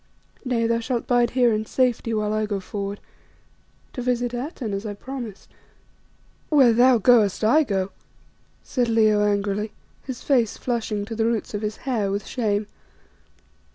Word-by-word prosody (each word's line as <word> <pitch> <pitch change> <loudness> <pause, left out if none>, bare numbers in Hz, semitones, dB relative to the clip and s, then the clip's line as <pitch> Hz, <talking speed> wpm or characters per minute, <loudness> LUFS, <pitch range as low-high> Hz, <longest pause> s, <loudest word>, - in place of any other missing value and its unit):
Nay, 245 -3 0
thou 230 0 +1
shalt 235 0 -2
bide 245 -1 +3
here 245 -3 +4
in 215 0 0
safety 245 -3 0
whilst 215 -1 0
I 215 0 0
go 205 -2 -2
forward 200 +1 -5 0.9
to 250 - -4
visit 245 0 -1
Atene 245 -3 -4
as 195 +1 -3
I 210 -2 -5
promised." 240 -3 -8 1.0
"Where 270 -6 +5
thou 245 +2 +5
goest, 220 -2 +4
I 280 +9 +5
go," 195 -6 -2 0.7
said 245 -3 -1
Leo 215 -2 +4
angrily, 205 +1 -1 0.3
his 260 -3 -7
face 240 -6 +2
flushing 220 -4 -2
to 225 +1 -6
the 225 0 +1
roots 230 -2 -2
of 205 - -3
his 210 0 -3
hair 225 -7 0
with 200 0 -3
shame. 210 -4 -1
225 Hz, 155 wpm, -23 LUFS, 210-245 Hz, 1.0 s, Where